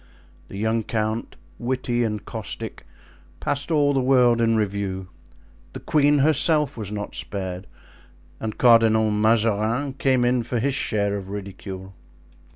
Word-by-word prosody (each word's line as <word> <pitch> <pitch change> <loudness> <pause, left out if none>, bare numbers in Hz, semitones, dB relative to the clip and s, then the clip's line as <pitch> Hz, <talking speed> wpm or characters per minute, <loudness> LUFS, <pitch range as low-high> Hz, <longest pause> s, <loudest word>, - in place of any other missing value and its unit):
The - - -9
young 110 +2 0
count, 110 +1 -3 0.2
witty 120 -1 -1
and 105 -2 -3
caustic, - - -7 0.5
passed 145 +2 -2
all 145 -3 +3
the 135 - +2
world 125 -2 +4
in 115 -1 +3
review; 100 -3 -2 0.6
the - - -6
queen 145 -1 +3
herself 150 0 +3
was 105 -3 -6
not 105 -1 -5
spared, 95 -1 -5 0.7
and 110 -1 -5
Cardinal 115 -2 +5
Mazarin 110 +4 +1
came 130 -2 +1
in 125 0 +2
for 120 +1 -3
his 135 +4 0
share 100 -6 0
of 95 -1 -8
ridicule. 95 -1 -7
115 Hz, 135 wpm, -23 LUFS, 105-130 Hz, 0.7 s, Cardinal